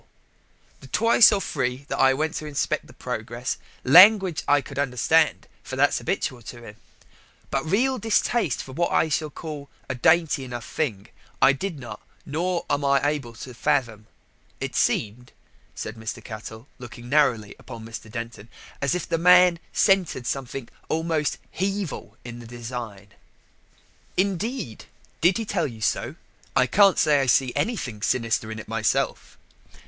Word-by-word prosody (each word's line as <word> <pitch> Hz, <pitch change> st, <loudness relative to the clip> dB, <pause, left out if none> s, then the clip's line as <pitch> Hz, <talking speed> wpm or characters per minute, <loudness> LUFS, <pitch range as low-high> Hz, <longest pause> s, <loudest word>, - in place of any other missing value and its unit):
The 135 Hz, -, -13 dB
twice 230 Hz, -, +6 dB
or 205 Hz, -, +2 dB
thrice 130 Hz, -7 st, -2 dB
that -, -, -3 dB
I 135 Hz, 0 st, +5 dB
went 155 Hz, +3 st, -1 dB
to 155 Hz, -, -6 dB
inspect 145 Hz, -2 st, -2 dB
his -, -, -15 dB
progress: -, -, -4 dB, 0.2 s
language 185 Hz, -, +7 dB
I 145 Hz, 0 st, +5 dB
could 135 Hz, 0 st, -7 dB
understand, 145 Hz, +4 st, +2 dB, 0.2 s
for -, -, -7 dB
that's -, -, +2 dB
'abitual 125 Hz, -2 st, -2 dB
to 120 Hz, +1 st, -9 dB
him, 105 Hz, -2 st, -11 dB, 0.7 s
but 135 Hz, -, 0 dB
reel 255 Hz, +7 st, +2 dB
distaste 220 Hz, -, +1 dB
for 130 Hz, -, -11 dB
what 170 Hz, +6 st, -1 dB
I 160 Hz, -, +2 dB
should 155 Hz, 0 st, -2 dB
call 150 Hz, -3 st, -7 dB, 0.2 s
a 130 Hz, -, -2 dB
dainty 150 Hz, +3 st, +2 dB
enough 120 Hz, -3 st, -6 dB
thing, 110 Hz, -9 st, -3 dB, 0.3 s
I 140 Hz, -, +6 dB
did 170 Hz, +4 st, -4 dB
not, 120 Hz, -, -9 dB, 0.2 s
nor 170 Hz, +4 st, -2 dB
am 145 Hz, -, 0 dB
I 140 Hz, 0 st, +4 dB
now 145 Hz, +2 st, +1 dB
able 140 Hz, -6 st, -4 dB
to 125 Hz, +2 st, -9 dB
fathom. 115 Hz, -3 st, -1 dB, 0.5 s
It -, -, -4 dB
seemed," 115 Hz, +4 st, 0 dB, 0.4 s
said 110 Hz, -, -5 dB
Mr. 110 Hz, 0 st, -6 dB
Cattell, 110 Hz, +2 st, -9 dB
looking 120 Hz, -1 st, -10 dB
narrowly 120 Hz, -7 st, +2 dB
upon 115 Hz, -3 st, -10 dB
Mr. 115 Hz, -1 st, -9 dB
Denton, 115 Hz, -2 st, -7 dB, 0.3 s
"as 140 Hz, +3 st, +1 dB
if 180 Hz, -, -3 dB
the 165 Hz, -, 0 dB
man 180 Hz, 0 st, +6 dB
scented 190 Hz, -, +2 dB
something 135 Hz, -2 st, -4 dB, 0.2 s
almost 160 Hz, -2 st, 0 dB
Hevil 195 Hz, -3 st, -3 dB
in 120 Hz, 0 st, -8 dB
the 120 Hz, -, -11 dB
design." 115 Hz, -4 st, -7 dB, 1.1 s
"Indeed? 195 Hz, -, -2 dB, 0.4 s
did 175 Hz, +4 st, +4 dB
he 225 Hz, -, -3 dB
tell 175 Hz, -6 st, -1 dB
you 115 Hz, -4 st, -10 dB
so? 105 Hz, -, -1 dB, 0.4 s
I 130 Hz, -, +5 dB
can't 195 Hz, +8 st, +5 dB
say 150 Hz, -2 st, +4 dB
I 135 Hz, -, -1 dB
see 125 Hz, 0 st, +3 dB
anything 130 Hz, -, -2 dB
sinister 115 Hz, -1 st, 0 dB
in 110 Hz, -, -6 dB
it 110 Hz, -, -8 dB
myself." 110 Hz, -1 st, -1 dB
140 Hz, 160 wpm, -24 LUFS, 120-170 Hz, 1.1 s, language